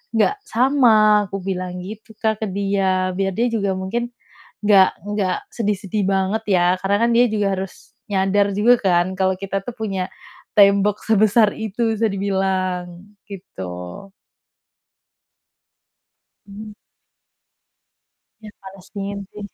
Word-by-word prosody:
nggak 225 - +2
sama," 225 -5 +4
aku 195 - -4
bilang 180 -1 -4
gitu 220 +2 -10
Kak, 220 -1 -1
ke - - -1
dia, 190 -1 0
biar 195 0 0
dia 240 +2 +1
juga 200 -4 0
mungkin 230 +6 -3 0.6
nggak 195 -2 +6 0.3
nggak 185 -3 0 0.2
sedih 210 -3 0
sedih 200 +1 -2
banget 195 +3 0
ya, 175 - +3 0.2
karena 200 +1 +2
kan - - +1
dia 245 - +5
juga 210 -2 0
harus 190 0 -8 0.2
nyadar 200 +1 +2
juga 235 +4 +5
kan 175 -2 +2
kalau 190 -1 +2
kita 195 0 -3
tuh 245 - -4
punya 195 -5 -3 0.5
tembok 200 0 +4
sebesar 215 0 +3
itu 220 +1 -1
bisa 225 +1 +1
dibilang, 190 -2 -1 0.4
gitu. 195 - -9 2.9
Mhm. 210 +1 -10 1.7
Ya, 215 - -10
Palestine 195 +1 -7
sih. 210 -1 -8
200 Hz, 125 wpm, -20 LUFS, 190-215 Hz, 2.9 s, nggak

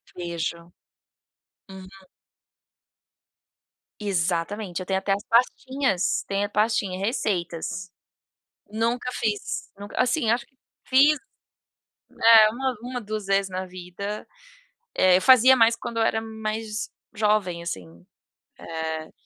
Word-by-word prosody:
Vejo, 170 -1 -4 1.0
uhum. 190 -1 -10 2.1
Exatamente, 180 0 -2
eu - - -6
tenho 190 +1 0
até 195 +1 -2
as 200 +1 0
pastinhas, 250 -3 +1
tem 200 0 -1
a - - -6
pastinha 210 -3 0
receitas. 185 -4 -2 0.8
Nunca 235 +4 -1
fiz, 210 -3 -3
nunca 205 +4 -3
assim, 250 -1 +1
acho 235 0 0
que - - -37 0.3
fiz 285 +3 +5 1.1
é 220 -2 +9
uma 260 +3 -2
uma, 245 0 -5
1 215 -1 -5
vezes 195 0 +1
na 185 0 -4
vida, 185 +3 -7 0.7
eh, 185 -1 +5
eu - - -1
fazia 260 +3 +7
mais 230 -1 +4
quando 230 - -6
eu 225 - +3
era 220 0 +1
mais 220 -1 -4 0.2
jovem, 210 -5 +1
assim, 85 - -7 0.5
eh, 160 -1 -5
205 Hz, 115 wpm, -25 LUFS, 180-230 Hz, 2.1 s, é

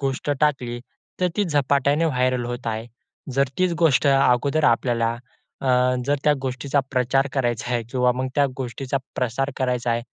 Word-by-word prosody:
गोष्ट 135 +1 -2
टाकली. 125 -5 0 0.4
तर 180 - +3
ती 205 - +2
झपाट्याने 145 0 +2
व्हायरल 130 -4 +1
होत 120 0 -6
आहे. 110 0 -3 0.5
जर 135 0 +2
तीच 185 -1 +2
गोष्ट 150 -3 +4
अगोदर 140 +2 +3
आपल्याला 115 -1 +2 0.5
अ, 135 - -4 0.4
जर 145 +1 +2
त्या 150 - +5
गोष्टीचा 135 +2 -1
प्रचार 130 +2 +2
करायचा 120 -3 -1
आहे 120 - 0
किंवा 125 0 +2
मग 130 +1 -2
त्या 145 -1 +3
गोष्टीचा 130 +1 -3 0.2
प्रसार 130 +3 -1
करायचा 125 -2 -1
आहे. 115 0 0
130 Hz, 160 wpm, -23 LUFS, 120-140 Hz, 0.5 s, त्या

